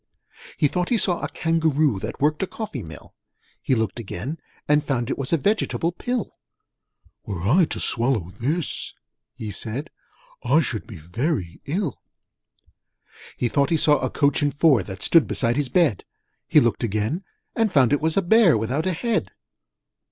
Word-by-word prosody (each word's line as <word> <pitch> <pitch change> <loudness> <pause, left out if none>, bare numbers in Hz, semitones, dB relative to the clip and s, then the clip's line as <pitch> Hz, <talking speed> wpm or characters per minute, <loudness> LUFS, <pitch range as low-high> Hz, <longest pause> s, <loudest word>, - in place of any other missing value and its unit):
He 145 - +3
thought 180 +4 -2
he 240 - +3
saw 180 -4 +2
a - - -3
Kangaroo 155 -7 +1
That 110 +3 -6
worked 150 +2 +1
a 190 - 0
coffee 205 - -6
mill: 80 -5 -11 0.5
He 130 - +1
looked 110 0 -2
again, 120 - -5 0.3
and 150 0 +3
found 130 -3 -1
it - - -2
was 135 - -2
A 165 - +4
Vegetable 175 -1 0
Pill. 245 +5 -3 0.9
'Were 95 -5 -4
I 155 - +4
to - - -5
swallow 115 -7 0
this,' 150 - -2 0.4
he 110 -2 -6
said, 115 - -4 0.5
'I 160 - +4
should 115 -7 -4
be 105 - -9
very 90 - -3
ill!' 165 - -2 1.4
He 120 - 0
thought 140 +3 +1
he 165 - +2
saw 150 -1 +4
a - - -1
Coach 140 -1 +1
and 145 0 +2
Four 145 -6 +4
That 95 +1 -6
stood 165 -3 +5
beside 120 -1 0
his 145 -2 -1
bed: 155 - +2 0.4
He - - +6
looked 120 -1 +1
again, 110 - -1 0.3
and 225 -3 +1
found 135 -5 +4
it 145 - +1
was 160 +2 +1
A 195 - +3
Bear 190 - +5
without 125 - -1
a 185 - +1
Head. 230 +6 -1
145 Hz, 175 wpm, -23 LUFS, 115-165 Hz, 1.4 s, He